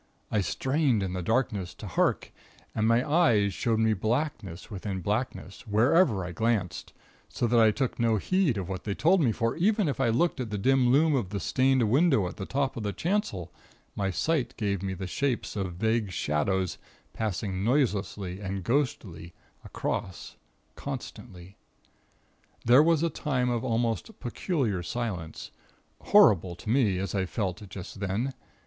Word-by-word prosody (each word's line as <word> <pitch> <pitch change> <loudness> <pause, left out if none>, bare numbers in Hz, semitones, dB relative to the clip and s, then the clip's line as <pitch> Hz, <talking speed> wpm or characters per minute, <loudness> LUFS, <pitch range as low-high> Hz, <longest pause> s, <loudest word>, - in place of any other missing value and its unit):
I 105 - +2
strained 130 - +1
in 95 -1 -3
the 90 - -3
darkness, 100 -3 -1
to - - -9
hark; 90 - 0 0.4
and 110 0 +1
my 115 +4 +3
eyes 120 - +3
showed 115 +2 0
me 110 0 +3
blackness 110 - -3
within 95 -1 -4
blackness, 100 +1 -3
wherever 115 - +3
I 90 - -5
glanced, 105 -2 -1 0.4
so - - -2
that 120 0 +3
I 110 -1 +6
took 125 +4 -2
no 115 -2 +2
heed 180 - +1
of 95 -3 -3
what 95 -1 -5
they 100 -2 -3
told 180 +3 +3
me; 125 -6 +3
for 115 +1 -1
even 205 +2 +2
if 140 - -2
I 130 - +2
looked 140 +7 +1
at 125 -3 -3
the 105 - -3
dim 130 +4 +3
loom 155 +3 +4
of 120 -9 0
the 100 0 -3
stained 130 - +2
window 135 - +3
at - - -8
the 95 - -5
top 135 0 -1
of 115 - -4
the 105 -1 -2
chancel, 160 - -2 0.4
my 100 -1 -1
sight 130 - -1
gave 100 -4 -1
me 95 -1 -3
the 95 +1 -5
shapes 125 +7 -2
of 95 -4 -3
vague 110 +2 0
shadows 90 +4 -1 0.3
passing 100 -3 -2
noiseless 115 -6 +1
and 95 0 -5
ghostly 95 - -2 0.3
across, 95 - -4 0.4
constantly. 90 +1 -8 1.1
There 125 +5 +7
was 165 0 +3
a 170 - +1
time 125 -5 -1
of 120 0 -1
almost 115 - -1
peculiar 120 - -1
silence, 90 -6 -5 0.5
horrible 95 - +5
to 105 +5 -5
me, 115 -7 +3
as 95 +1 -3
I 95 -2 0
felt 95 -2 -3
just 95 0 -8
then. 105 +7 -2
110 Hz, 165 wpm, -28 LUFS, 95-130 Hz, 1.1 s, There